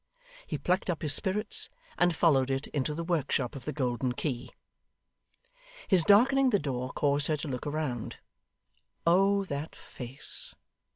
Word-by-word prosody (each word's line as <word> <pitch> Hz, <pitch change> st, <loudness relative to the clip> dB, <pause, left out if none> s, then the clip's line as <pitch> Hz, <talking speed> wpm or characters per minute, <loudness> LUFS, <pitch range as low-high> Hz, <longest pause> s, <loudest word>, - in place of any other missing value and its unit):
He -, -, -2 dB
plucked 185 Hz, +2 st, 0 dB
up 170 Hz, -2 st, -2 dB
his 150 Hz, -2 st, +4 dB
spirits, 210 Hz, +5 st, +1 dB, 0.3 s
and 175 Hz, -1 st, +2 dB
followed 135 Hz, -6 st, +3 dB
it 135 Hz, +1 st, -1 dB
into 150 Hz, +1 st, -2 dB
the 170 Hz, -, -3 dB
workshop 145 Hz, -6 st, -1 dB
of 135 Hz, -, -9 dB
the 150 Hz, -, -2 dB
Golden 125 Hz, -2 st, -1 dB
Key. 125 Hz, -2 st, -3 dB, 1.4 s
His 185 Hz, -4 st, +5 dB
darkening 255 Hz, +8 st, +5 dB
the 210 Hz, -, +3 dB
door 130 Hz, -6 st, -3 dB
caused 140 Hz, 0 st, +1 dB
her 155 Hz, -, +1 dB
to 150 Hz, -, -5 dB
look 130 Hz, 0 st, -4 dB
round. 145 Hz, -6 st, -3 dB, 0.9 s
Oh 195 Hz, +4 st, +4 dB
that 145 Hz, -2 st, -5 dB
face! 125 Hz, +2 st, -7 dB
150 Hz, 150 wpm, -29 LUFS, 135-175 Hz, 1.4 s, His